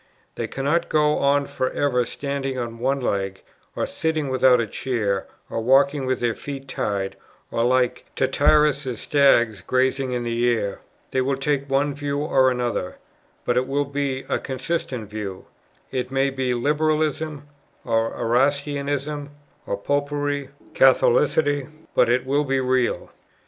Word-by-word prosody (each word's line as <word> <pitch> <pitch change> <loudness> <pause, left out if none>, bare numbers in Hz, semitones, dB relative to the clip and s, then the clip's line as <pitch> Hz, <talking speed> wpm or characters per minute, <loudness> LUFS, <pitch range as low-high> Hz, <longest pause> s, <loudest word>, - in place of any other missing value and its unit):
They - - -3
cannot 145 +6 0
go 150 -1 +3
on 140 0 +3
for 130 - -2
ever 125 -4 0
standing 140 -1 -3
on 115 -2 -4
one 135 +3 +1
leg, 95 -5 -2 0.3
or - - 0
sitting 155 -3 -2
without 130 -1 +4
a 115 - +1
chair, 105 -4 -2 0.2
or 115 - -3
walking 135 +3 +3
with 130 -1 0
their 120 -1 +1
feet 135 +1 -7
tied, 100 -6 -2 0.4
or 115 - 0
like 125 0 +1
Tityrus's 140 -2 +2
stags 120 - +3
grazing 130 +5 +1
in 120 -1 -1
the 120 0 +1
air. 100 -2 -4 0.3
They 130 - +1
will 135 +1 0
take 140 0 -1
one 140 +2 +1
view 145 0 -3
or 135 -3 +3
another, 120 -7 -2 0.5
but 120 - +1
it 130 +1 +1
will 140 +1 0
be 140 -1 -2
a - - 0
consistent 130 -4 -3
view. 100 -3 -6 0.5
It 130 -1 -2
may 135 +1 +1
be 130 -2 -1
Liberalism, 150 +2 0 0.4
or 115 0 +1
Erastianism, 140 +3 0 0.4
or 100 - -1
Popery, 145 +4 -1
or - - -18 0.2
Catholicity; 160 - +3 0.3
but - - +4
it 125 +1 +2
will 140 +3 +1
be 135 -1 0
real." 130 -1 0
135 Hz, 150 wpm, -23 LUFS, 125-145 Hz, 0.5 s, without